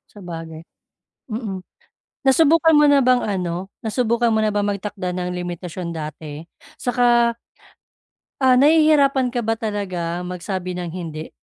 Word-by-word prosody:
Sabagay. 165 Hz, -4 st, -8 dB, 0.7 s
Mm. 210 Hz, -5 st, -4 dB, 0.6 s
Nasubukan 320 Hz, +4 st, +5 dB
mo 295 Hz, -, +6 dB
na 285 Hz, -, +5 dB
bang 250 Hz, -1 st, +3 dB
ano, 185 Hz, -2 st, -3 dB
nasubukan 235 Hz, +1 st, 0 dB
mo 220 Hz, -, +2 dB
na 215 Hz, -, +2 dB
bang 205 Hz, -1 st, 0 dB
magtakda 200 Hz, -2 st, -3 dB
ng 180 Hz, 0 st, -3 dB
limitasyon 175 Hz, 0 st, -5 dB
dati 155 Hz, -1 st, -7 dB, 0.3 s
'saka 240 Hz, -1 st, +2 dB, 1.0 s
ah, 260 Hz, -1 st, +5 dB
nahihirapan 285 Hz, -2 st, +4 dB
ka 240 Hz, -, 0 dB
ba 225 Hz, 0 st, -1 dB
talaga 180 Hz, -5 st, -3 dB
magsabi 180 Hz, +1 st, -4 dB
ng 180 Hz, -1 st, -4 dB
hindi? 160 Hz, -3 st, -6 dB
205 Hz, 125 wpm, -21 LUFS, 175-245 Hz, 1.0 s, mo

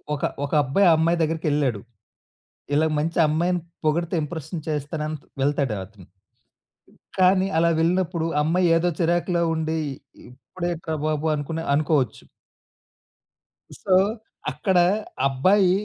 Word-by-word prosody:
ఒక 140 Hz, -, -8 dB, 0.2 s
ఒక -, -, -8 dB
అబ్బాయి, 175 Hz, +9 st, +3 dB
అమ్మాయి 165 Hz, +2 st, +2 dB
దగ్గరికెళ్ళాడు. 150 Hz, -, 0 dB, 0.9 s
ఇలా 155 Hz, +2 st, +3 dB
మంచి 165 Hz, +3 st, -2 dB
అమ్మాయిని 175 Hz, +3 st, 0 dB, 0.2 s
పొగిడితే 170 Hz, +3 st, 0 dB
ఇంప్రెషన్ 160 Hz, +1 st, -6 dB
చేస్తానని 150 Hz, +1 st, -3 dB, 0.2 s
వెళ్తాడు 140 Hz, -4 st, 0 dB
అతను. 95 Hz, -3 st, -17 dB, 1.1 s
కానీ, 185 Hz, +1 st, +4 dB
అలా 170 Hz, 0 st, +3 dB
వెళ్ళినప్పుడు, 170 Hz, -1 st, 0 dB
ఆ -, -, +3 dB
అమ్మాయి 175 Hz, +3 st, +2 dB
ఏదో 175 Hz, +1 st, +2 dB
చిరాకులో 170 Hz, +1 st, +1 dB
ఉండి. 160 Hz, 0 st, -2 dB, 0.5 s
ఇప్పుడేంట్రా 165 Hz, +4 st, -5 dB
బాబు 155 Hz, 0 st, -1 dB
అనుకునే 160 Hz, +3 st, -4 dB
అనుకోవచ్చు. 145 Hz, -4 st, 0 dB, 1.6 s
సో 190 Hz, -2 st, +3 dB, 0.6 s
అక్కడ 190 Hz, -3 st, 0 dB, 0.5 s
అబ్బాయి 185 Hz, +8 st, +3 dB
160 Hz, 105 wpm, -23 LUFS, 150-175 Hz, 1.6 s, కానీ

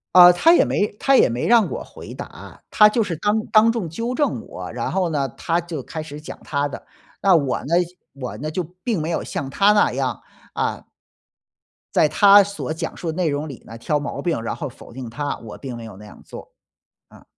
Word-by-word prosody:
呃， 180 Hz, -1 st, +10 dB
他 325 Hz, -, +5 dB
也 -, -, +6 dB
没 205 Hz, -, +1 dB
他 275 Hz, -, +3 dB
也 -, -, +6 dB
没 120 Hz, +2 st, -2 dB
让 230 Hz, -3 st, +5 dB
我 -, -, -4 dB
回 -, -, -11 dB
答， -, -, -10 dB
他 210 Hz, -, +6 dB
就 230 Hz, +2 st, +1 dB
是 175 Hz, -, -3 dB
当 210 Hz, +4 st, 0 dB
当 220 Hz, +1 st, +5 dB
众 225 Hz, -8 st, -3 dB
纠 230 Hz, +10 st, -3 dB
正 290 Hz, +2 st, -1 dB
我。 -, -, -8 dB
然 -, -, -3 dB
后 185 Hz, -3 st, 0 dB
呢， 140 Hz, -3 st, 0 dB
他 170 Hz, +7 st, -1 dB
就 165 Hz, -5 st, -5 dB
开 155 Hz, +4 st, -6 dB
始 150 Hz, -1 st, -9 dB
讲 155 Hz, -, -9 dB
他 145 Hz, 0 st, -1 dB
的， -, -, -9 dB, 0.4 s
那 190 Hz, -3 st, +5 dB
我 140 Hz, -5 st, +1 dB
呢 160 Hz, -, -4 dB, 0.4 s
我 130 Hz, -3 st, -7 dB
呢 155 Hz, +2 st, -4 dB
就 180 Hz, +3 st, -2 dB, 0.2 s
并 220 Hz, -9 st, -1 dB
没 160 Hz, -, -3 dB
有 165 Hz, -, -1 dB
像 135 Hz, -, -4 dB
他 200 Hz, +8 st, +4 dB
那 205 Hz, -, +3 dB
样， -, -, -2 dB, 0.3 s
啊 -, -, -2 dB, 1.1 s
在 -, -, +4 dB
他 200 Hz, -1 st, +7 dB
所 200 Hz, -5 st, -5 dB
讲 160 Hz, -, -5 dB
述 165 Hz, -2 st, -3 dB
的 -, -, -7 dB
内 175 Hz, -3 st, +1 dB
容 145 Hz, +2 st, -2 dB
里 135 Hz, -5 st, -9 dB
呢 115 Hz, -, -9 dB
挑 145 Hz, +6 st, -1 dB
毛 145 Hz, -, -5 dB
病， 165 Hz, -10 st, -1 dB
然 115 Hz, -, -3 dB
后 145 Hz, -, -5 dB
否 120 Hz, -, -13 dB
定 130 Hz, 0 st, -7 dB
他， 145 Hz, +2 st, -3 dB
我 110 Hz, -2 st, -10 dB
并 130 Hz, -4 st, -6 dB
没 115 Hz, -, -9 dB
有 110 Hz, -, -10 dB
那 105 Hz, +2 st, -13 dB
样 105 Hz, -, -14 dB
做。 -, -, -11 dB, 0.6 s
啊。 -, -, -18 dB
165 Hz, 240 characters per minute, -21 LUFS, 140-205 Hz, 1.1 s, 呃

